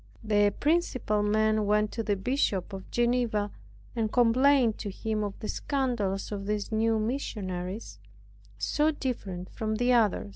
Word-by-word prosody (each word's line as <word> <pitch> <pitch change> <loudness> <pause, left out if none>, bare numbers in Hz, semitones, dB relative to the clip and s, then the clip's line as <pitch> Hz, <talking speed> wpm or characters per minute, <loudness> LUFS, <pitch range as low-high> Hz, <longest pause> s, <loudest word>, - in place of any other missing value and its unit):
The 205 -1 +3
principal 285 -9 +1
men 215 0 +2
went 210 0 +2
to 225 - -3
the 210 -2 0
Bishop 200 -3 -1
of 190 -1 -8
Geneva, 235 -4 +1 0.4
and 220 -2 0
complained 250 0 +4
to 205 - -4
him 215 +2 -2
of 205 -1 -4
the 215 - -4
scandals 235 -11 -1
of 200 -1 -4
these 210 0 -2
new 225 +1 +2
missionaries, 210 -5 -4 0.6
so 300 +1 +1
different 200 - -4
from 220 -1 -2
the 245 +3 +2
others. 220 - +2
215 Hz, 145 wpm, -28 LUFS, 205-245 Hz, 0.6 s, complained